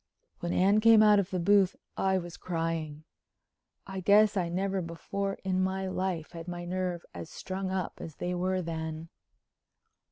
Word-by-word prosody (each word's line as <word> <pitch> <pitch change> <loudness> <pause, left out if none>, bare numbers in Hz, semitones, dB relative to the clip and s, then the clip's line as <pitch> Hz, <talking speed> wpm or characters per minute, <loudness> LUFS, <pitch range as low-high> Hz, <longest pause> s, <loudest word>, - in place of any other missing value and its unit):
When 175 - -3
Anne 200 +4 +4
came 225 0 +7
out 210 -1 +6
of 195 -1 -1
the 185 - -2
booth 195 +1 +4 0.2
I 190 0 +2
was 175 -1 -5
crying. 165 -3 -3 0.8
I 195 -1 -5
guess 205 +3 +5
I 180 -3 0
never 190 +2 -1
before 195 +4 -4
in 185 -1 +1
my 190 +1 -1
life 185 -3 -2
had 165 0 -8
my 175 0 -5
nerves 180 -1 -2
as 85 -2 -7
strung 190 0 -4
up 185 -2 -3
as 160 - -8
they 180 0 -3
were 185 +1 0
then. 160 0 -5
185 Hz, 165 wpm, -30 LUFS, 170-195 Hz, 0.8 s, came